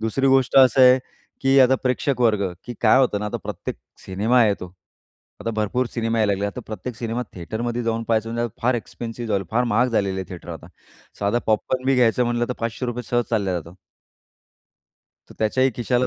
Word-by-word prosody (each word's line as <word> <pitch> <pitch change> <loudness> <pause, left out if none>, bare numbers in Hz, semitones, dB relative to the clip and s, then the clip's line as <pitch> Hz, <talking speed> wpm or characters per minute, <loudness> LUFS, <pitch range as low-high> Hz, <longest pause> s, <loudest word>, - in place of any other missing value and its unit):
दुसरी 115 +5 0
गोष्ट 135 -1 +3
असं 130 -1 +6
आहे 125 +1 +7 0.4
की 135 +1 +4
आता 130 +1 +6
प्रेक्षक 130 +1 0
वर्ग. 105 -6 +2
की 120 - -7
काय 120 +3 +5
होतं 120 -6 +2
ना 105 - -3
आता 105 - -3
प्रत्येक - - -5 0.3
सिनेमा 110 +6 +3
येतो. 95 -4 -2 0.7
आता 115 - -2
भरपूर 110 +4 0
सिनेमा 115 -1 -1
यायला 105 -2 +2
लागले. 100 +1 -1
आता 100 +5 -5
प्रत्येक 110 +3 -6
सिनेमा 115 +1 -3
थिएटरमध्ये 115 +7 -3
जाऊन 115 0 -1
पाहायचं, 115 0 0
म्हणजे 120 0 -1
फार 125 +1 +2
एक्सपेन्सिव 115 0 -6
झाल. 100 -3 0
फार 120 +3 +2
महाग 120 +2 +2
झालेलं 100 -5 0
आहे 95 -2 -5
थिएटर 90 -1 -9
आता. 80 - -10 0.5
साधा 105 +4 +1
पॉपकॉर्न 120 +4 0
बी 135 - +4
घ्यायचं 125 -1 +3
म्हटलं 120 0 -1
तर - - -1
₹500 120 +1 -3
सहज 120 -1 +2
चालल्या 100 -5 0
जाता. 85 - -13 1.6
तर - - -12
त्याच्याही 130 +5 +2
खिशाला 125 +1 +1
115 Hz, 185 wpm, -22 LUFS, 105-125 Hz, 1.6 s, आहे